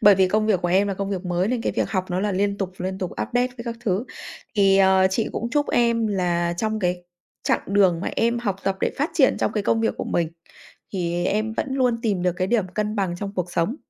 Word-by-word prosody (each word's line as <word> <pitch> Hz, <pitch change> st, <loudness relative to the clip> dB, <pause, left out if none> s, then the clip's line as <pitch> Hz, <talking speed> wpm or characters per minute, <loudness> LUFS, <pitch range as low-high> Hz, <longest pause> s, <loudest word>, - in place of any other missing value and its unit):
bởi 205 Hz, -1 st, +8 dB
vì 190 Hz, -1 st, +3 dB
công 215 Hz, +2 st, +1 dB
việc 195 Hz, -5 st, +2 dB
của 175 Hz, -, +1 dB
em 195 Hz, +3 st, +3 dB
là 195 Hz, -, -1 dB
công 200 Hz, +1 st, -3 dB
việc 190 Hz, -1 st, -3 dB
mới 180 Hz, +3 st, 0 dB
nên 240 Hz, -2 st, -1 dB
cái -, -, -1 dB
việc -, -, -1 dB
học 185 Hz, -3 st, 0 dB
nó 180 Hz, +1 st, 0 dB
là 205 Hz, -1 st, 0 dB
liên 200 Hz, +1 st, 0 dB
tục, 190 Hz, -2 st, -3 dB
liên 190 Hz, +1 st, -3 dB
tục 185 Hz, -, -3 dB
update 245 Hz, +1 st, 0 dB
các 255 Hz, 0 st, -13 dB
các 230 Hz, -1 st, -4 dB
thứ. 210 Hz, 0 st, 0 dB, 0.5 s
Thì, 195 Hz, -1 st, +4 dB
ờ, 190 Hz, -1 st, +5 dB
chị 220 Hz, +3 st, 0 dB
cũng 235 Hz, -, -3 dB
chúc 290 Hz, +1 st, +1 dB
em 235 Hz, -2 st, +2 dB
là 175 Hz, -3 st, 0 dB
trong 220 Hz, +2 st, -1 dB
cái 180 Hz, -2 st, -1 dB, 0.4 s
chặng -, -, +1 dB
đường 190 Hz, -4 st, +3 dB
mà -, -, -2 dB
em 235 Hz, +1 st, +2 dB
học 200 Hz, -5 st, -2 dB
tập 195 Hz, 0 st, 0 dB
để -, -, +1 dB
phát 300 Hz, +4 st, 0 dB
triển 280 Hz, -6 st, +4 dB
trong -, -, 0 dB
cái 210 Hz, -, -1 dB
công 225 Hz, +2 st, +1 dB
việc 225 Hz, -, +1 dB
của -, -, -2 dB
mình 170 Hz, -2 st, 0 dB, 0.6 s
thì 175 Hz, -2 st, -1 dB
em 215 Hz, +3 st, 0 dB
vẫn 255 Hz, -, -2 dB
luôn 250 Hz, -3 st, +1 dB
tìm 200 Hz, -6 st, 0 dB
được 180 Hz, -1 st, +2 dB
cái 185 Hz, +1 st, -1 dB
điểm 210 Hz, -4 st, +1 dB
cân 210 Hz, +3 st, -2 dB
bằng 185 Hz, -3 st, -1 dB
trong 200 Hz, +1 st, -5 dB
cuộc 180 Hz, -1 st, -3 dB
sống. 180 Hz, -, 0 dB
200 Hz, 265 wpm, -23 LUFS, 185-225 Hz, 0.6 s, bởi